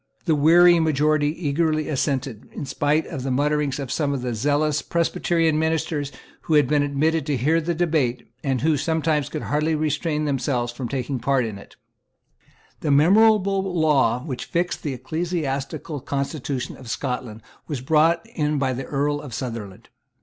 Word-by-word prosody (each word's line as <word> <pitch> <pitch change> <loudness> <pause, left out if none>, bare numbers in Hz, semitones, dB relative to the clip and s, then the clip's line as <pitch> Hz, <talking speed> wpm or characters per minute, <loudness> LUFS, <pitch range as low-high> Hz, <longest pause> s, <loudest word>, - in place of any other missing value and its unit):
The 165 - +3
weary 170 +4 +6
majority 155 -1 +2
eagerly 155 0 0
assented, 135 -5 -2
in - - -5
spite 145 +3 0
of 135 - -6
the 135 - -3
muttering 145 +2 +1
of 135 -3 -5
some 140 -5 -1
zealous 145 +5 +1
Presbyterian 165 -1 +1
ministers 160 -2 -1 0.3
who 160 - +2
had 145 -4 +5
been 150 +1 +2
admitted 145 +3 +1
to 145 -3 0
hear 155 +7 +2
the 170 +2 -2
debate, 155 -8 0 0.2
and 135 -3 0
who 160 - +3
could 150 - +1
sometimes 160 -1 0
hardly 155 +1 -1
restrain 155 0 -1
themselves 125 -3 -1
from 120 0 -5
taking 130 -1 -2
part 130 +1 +1
in 105 -3 -6
it, - - -15 1.0
The 150 - -2
memorable 195 +6 +4 0.2
law 135 -6 +3
which 130 -6 -5
fixed 175 +1 -1
the 140 -4 -3
ecclesiastical 155 -2 -3
constitution 140 -1 -3
of 125 -3 -11
Scotland 120 -3 -4 0.2
was 145 -6 -4
brought 160 +4 +3
in 150 -1 0
by 135 -2 0
the 130 +1 -5
Earl 145 +1 -1
of 130 -7 -7
Sutherland. 115 -7 -6
145 Hz, 155 wpm, -23 LUFS, 135-160 Hz, 1.0 s, weary